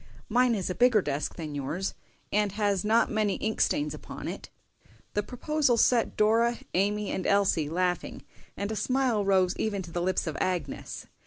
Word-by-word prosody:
Mine 245 +1 +3
is 190 -4 -2
a 180 - -1
bigger 245 -2 +4
desk 145 +1 -2
than 155 -3 -6
yours, 150 +7 -3 0.4
and 210 -1 +2
has 205 -3 0
not 220 +2 +3
many 215 -2 +1
ink 220 0 -2
stains 150 0 +1
upon 150 - -8
it." - - -6 0.6
The 205 - +1
proposal 255 +3 0
set 235 0 +3
Dora, 230 +2 +3 0.2
Amy, 205 +2 0
and 185 - -2
Elsie 195 -7 +2
laughing, 180 +1 -1 0.3
and 200 +2 -3
a - - -2
smile 255 -3 +1
rose 190 -2 +3
even 205 -3 -1
to 170 - -10
the 175 - -2
lips 185 +1 0
of 160 - -3
Agnes. 180 -2 -3
200 Hz, 175 wpm, -28 LUFS, 180-225 Hz, 0.6 s, bigger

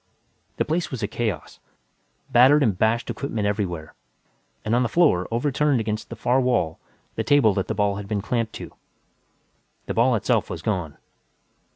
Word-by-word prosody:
The - - +1
place 170 +3 -1
was 130 -5 -5
a - - +1
chaos, 105 -8 -4 0.7
battered 135 +5 +6
and 110 -7 +2
bashed 110 +5 +1
equipment 115 -3 -3
everywhere, 90 -6 -2 0.7
and 110 - 0
on 120 - +3
the 120 - 0
floor, 145 - +3
overturned 135 +3 +1
against 110 -1 -3
the - - -6
far 130 +2 +1
wall, 120 -11 0 0.3
the - - -2
table 140 -8 +4
that 95 -1 -2
the - - -2
ball 100 -1 +1
had 100 -1 -7
been 105 -1 -1
clamped 115 +2 -2
to. - - -8 1.1
The - - -3
ball 120 +2 +3
itself 105 - 0
was 85 -1 -6
gone. 90 -8 -2
110 Hz, 170 wpm, -23 LUFS, 100-125 Hz, 1.1 s, battered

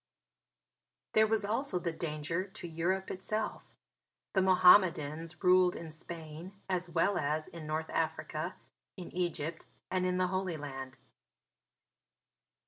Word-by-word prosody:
There 220 0 +6
was 215 -1 +2
also 225 0 0
the 175 -1 -1
danger 160 +2 -2
to 190 -2 -9
Europe 175 +4 -1
itself. 215 +4 -3 0.7
The 190 - +4
Mohammedans 175 -3 +4
ruled 180 0 +5
in 165 -1 -7
Spain 160 +2 -8
as 180 -1 0
well 170 +4 +2
as 155 +1 -1
in 165 -2 -9
North 155 +1 -2
Africa, - - -2 0.4
in 180 - -7
Egypt 170 -2 -2 0.2
and 185 -1 +1
in 180 0 0
the 185 - +3
Holy 185 -3 -1
Land. 135 -3 -7
175 Hz, 125 wpm, -32 LUFS, 160-185 Hz, 0.7 s, There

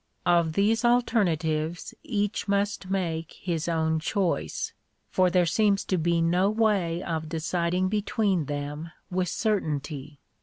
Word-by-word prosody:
Of 170 -2 +3
these 215 +5 +2
alternatives 175 -10 +1
each 205 -3 -2
must 200 -1 0
make 165 -4 -2
his 170 -3 -3
own 160 -1 +1
choice; 165 - -1 0.4
for 185 -1 +3
there 180 0 +3
seems 200 +3 +2
to 185 - 0
be 170 +1 +2
no 180 +4 +3
way 200 -6 +1
of 160 -2 -3
deciding 170 +3 0
between 205 - 0
them 145 +3 -5 0.2
with 180 0 0
certainty. 150 - -2
175 Hz, 125 wpm, -27 LUFS, 160-200 Hz, 0.4 s, Of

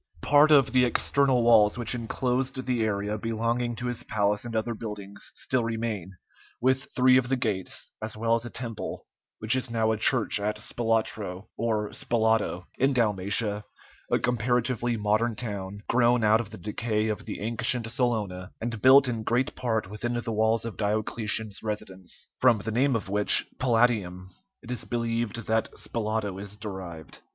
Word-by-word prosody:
] - - -25
Part 145 +1 +5
of 140 -3 +5
the 130 -1 +5
external 130 +1 +2
walls 110 -2 +5
which 120 0 +1
inclosed 130 +2 -2
the 125 -3 0
area 105 0 -2
belonging 115 +2 -1
to 120 - -6
his 120 -1 -3
palace 105 -1 0
and 115 -1 -6
other 110 +2 -1
buildings 105 -3 -7
still 130 -2 0
remain, 110 -5 -3 0.5
with 130 +1 +1
three 130 0 +4
of 125 -1 0
the 135 - +2
gates, 110 -7 -2
as 110 0 -5
well 115 +1 +1
as 115 0 +1
a 120 - -6
temple, 115 -2 -5 0.3
which 110 +3 +2
is 130 -1 -2
now 110 -1 +1
a 110 - 0
church 110 -1 +1
at 105 +1 -2
Spalatro, 110 -4 -2
or 110 -2 -1
Spalato, 110 -6 0
in 135 +2 +3
Dalmatia, 105 -2 +2 0.5
a - - +3
comparatively 120 0 0
modern 110 +2 +1
town, 100 -3 -6
grown 120 -1 +3
out 110 +2 +4
of 110 - -9
the - - -9
decay 105 +3 -2
of 105 -1 -4
the - - -6
ancient 115 +2 0
Salona, 105 -7 -2
and 115 -2 -4
built 135 +1 +7
in 115 -3 -2
great 120 +4 0
part 110 -5 -2
within 110 +4 -4
the 115 -1 -4
walls 110 +1 +1
of 115 - -6
Diocletian's 110 0 -2
residence, 105 -4 -4
from 125 -3 +5
the 105 +2 -4
name 130 +3 +2
of 110 - -3
which, 105 +1 +7
"Palatium," 110 -7 +1 0.3
it 120 - -8
is 125 - -1
believed 115 -1 -2
that 110 0 0
"Spalato" 110 -4 -2
is 100 0 -7
derived. 95 -6 -8
115 Hz, 170 wpm, -27 LUFS, 105-120 Hz, 0.5 s, built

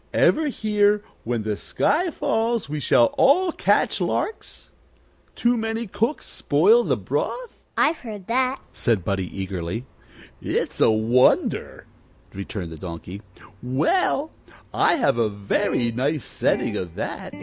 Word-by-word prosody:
Ever 315 -1 +3
hear, 210 -4 +1 0.2
When 115 -1 -1
the 105 -1 -1
sky 330 - 0
falls 230 - -1
we 150 +1 -4
shall 120 -3 +3
all 350 +6 +4
catch - - +1
larks? 440 - -3 0.6
Too 240 +1 +2
many 225 0 -2
cooks 230 +7 -2
spoil 465 +3 +3
the - - 0
broth?" - - -4 0.2
"I've 325 - +2
heard 210 -6 -8
that," 255 +4 0
said 110 -8 0
Buddie, 95 -2 -1
eagerly. 95 +4 -4 0.6
"It's - - -2
a - - +6
wonder," 110 +3 +2 0.5
returned 95 -3 -6
the 80 - -8
Donkey. 90 +3 -8 0.4
"Well, 285 - +1 0.4
I - - +3
have 245 - +1
a 115 -2 +2
very 100 +4 0
nice 140 +5 -1
setting - - 0
of 85 -3 -5
that." - - -5
150 Hz, 130 wpm, -23 LUFS, -, 0.6 s, a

